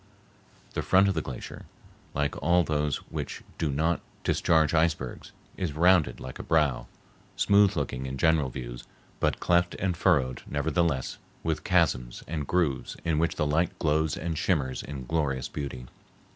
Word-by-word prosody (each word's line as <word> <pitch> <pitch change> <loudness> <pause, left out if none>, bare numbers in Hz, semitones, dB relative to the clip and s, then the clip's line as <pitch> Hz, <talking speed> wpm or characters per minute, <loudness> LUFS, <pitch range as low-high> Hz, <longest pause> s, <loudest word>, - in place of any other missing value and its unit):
The - - -1
front 95 +1 +4
of 100 - +2
the 80 - -1
glacier, 65 -4 -8 0.5
like 70 0 0
all 85 +2 +4
those 75 -3 0 0.2
which - - -5 0.2
do 80 -3 0
not 80 +5 +1 0.2
discharge 80 -1 +3
icebergs, 80 -6 0 0.3
is 85 -6 -2
rounded 85 -5 +4
like 65 - -8
a - - -5
brow, 70 -7 +1 0.5
smooth 100 0 +4
looking 65 -3 -2
in 65 +1 -4
general 80 -1 +3
views, - - -7 0.3
but - - +1
cleft 85 0 +2
and 90 -2 -1
furrowed, 70 -9 +2
nevertheless, 75 -1 0 0.2
with 80 -1 -1
chasms 75 -9 +1
and 75 -3 -3
grooves 85 -7 0
in 80 -2 +1
which 85 +1 +1
the 75 - 0
light 80 +3 +1
glows 80 0 +1
and 80 -1 -3
shimmers 70 -8 0
in 70 -3 -7
glorious 70 -3 -1
beauty. 70 -4 -6
75 Hz, 155 wpm, -28 LUFS, 70-85 Hz, 0.5 s, front